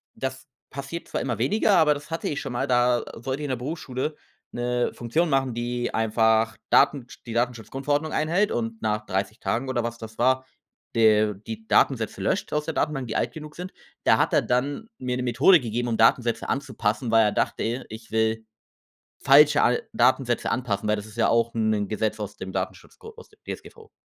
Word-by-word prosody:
das 130 0 -5 0.3
passiert 140 +5 -6
zwar - - -2
immer 125 -3 -2
weniger, 200 - +3
aber 155 -3 +5
das 145 +2 -10
hatte 165 - -2
ich 145 - -3
schon 135 - -5
mal. 135 +3 -1
Da 125 -1 +3
sollte 130 +4 -4
ich - - -3
in - - -4
der 130 - 0
Berufsschule 135 +1 -4 0.4
'ne 120 0 -1
Funktion 155 +9 0
machen, 135 -3 +1
die 120 0 -2
einfach 110 0 +2
Datensch 130 -5 +2
die 115 - -6
Datenschutzgrundverordnung 135 +6 -1
einhält 175 +7 +1
und 115 -1 -3
nach 105 -1 -1
30 95 +3 -2
Tagen 125 +3 -2
oder 120 -2 0
was 115 0 -4
das 110 -1 -10
war, 130 +2 +2 0.5
de 110 -2 +4
die 110 0 -7
Datensätze - - +2
löscht - - -1
aus 150 0 0
der 160 - -3
Datenbank, 135 -4 -1
die 110 - -4
alt - - 0
genug 150 -1 -9
sind. 180 +1 -7 0.3
Da - - +5
hat - - +1
er - - +5
dann 140 - -1
mir 125 -1 -2
'ne 125 - -2
Methode 130 - +5
gegeben, 120 -1 -3
um 115 - -1
Datensätze 115 +1 +2
anzupassen, 120 -3 -1
weil 115 -1 +5
er 105 - +2
dachte, 120 +3 -1
ich 110 +1 -10
will 110 0 0 0.8
falsche 145 +2 +6
al 125 - +2
Datensätze 125 0 +2
anpassen, 110 -5 -1
weil 105 - +2
das 105 0 -7
ist 110 +1 -14
ja - - +3
auch 115 0 +2
'n 110 -2 +1
Gesetz 110 +1 -1
aus 105 -1 -5
dem 95 0 -7
Datenschutzgo 450 - -6
aus 465 - -13
dem 425 - -25
DSGVO. 450 -2 -9
120 Hz, 195 wpm, -25 LUFS, 110-140 Hz, 0.8 s, falsche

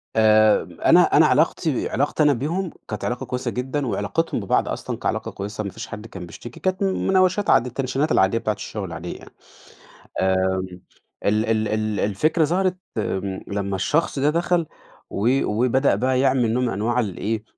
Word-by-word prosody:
آآ 110 -1 +5 0.2
أنا 175 +1 +7 0.2
أنا 155 - +7
علاقتي 150 +1 +1
علاقتي 145 +4 +1
أنا 145 -1 +5
بيهم، 165 +8 -2 0.2
كانت - - -5
علاقة 125 0 -3
كويسة 125 -1 -3
جدًا، 130 +2 -2
وعلاقتهم 165 +3 -1
ببعض 100 - +1
أصلًا - - -4
كعلاقة - - -2
كويسة 105 +2 -5
ما 100 - -4
فيش - - -8
حد 105 +1 -8
كان 95 -5 -8
بيشتكي. 120 +7 -11
كانت 185 +1 -1
مناوشات 190 +1 +2
عاد 120 - +5
التنشينات 135 +4 -1
العادية 95 +4 +3
بتاعة 110 -2 -1
الشغل 105 0 -6
العادية 85 0 -6
يعني. - - -15 0.9
آمم 95 -1 0 0.4
ال 105 +2 +2
ال 110 -1 +1
ال 110 -1 -1
الفكرة 155 - +2
ظهرت 185 +3 0 0.2
آمم 95 -2 -2
لمّا 100 -1 -2
الشخص 145 - 0
ده 145 +2 +3
دخل 170 +1 +1 0.4
و 125 +7 +1
وبدأ 125 +2 +2
بقى 130 +4 +1
يعمل 130 -4 +2
نوع 125 +1 +1
من 120 - +1
أنواع 115 +5 0
ال 100 -7 -2
إيه، 110 0 -2
120 Hz, 170 wpm, -22 LUFS, 105-150 Hz, 0.9 s, أنا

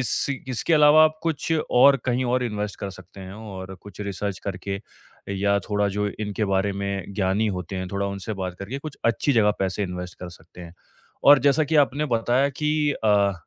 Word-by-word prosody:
इस 125 - 0
इ 135 - -1
इसके 145 +7 +1
अलावा 150 +1 +7
आप 155 0 0
कुछ 165 0 -1 0.2
और 140 +3 +6
कहीं 130 0 0
और 125 +1 +1
इन्वेस्ट 105 -2 -3
कर 100 - -4
सकते 95 +1 -13
हैं 95 0 -8
और 95 -3 -8
कुछ 105 -1 -12
रीसर्च 100 -1 -4
करके 100 0 -4 0.6
या 100 +1 +2
थोड़ा 105 0 +1
जो 105 0 0
इनके 105 0 -2
बारे 95 +1 +1
में 100 -1 -3
ज्ञानी 100 +2 +1
होते 90 +2 -5
हैं, 95 0 -4
थोड़ा 100 +1 -2
उनसे 100 +2 -5
बात 95 -2 -4
करके 115 +8 -5
कुछ 150 0 -8
अच्छी 130 +4 +2
जगह 110 -3 +4
पैसे 95 +1 -1
इन्वेस्ट 90 -1 -6
कर 90 - -6
सकते 85 +1 -15
हैं। 85 -1 -10 0.5
और 145 0 +9
जैसा 145 +3 +3
कि 155 +2 0
आपने 145 0 +3
बताया 120 +3 +2
कि 150 +1 0
अ, 100 -2 +4
105 Hz, 200 wpm, -24 LUFS, 95-135 Hz, 0.6 s, और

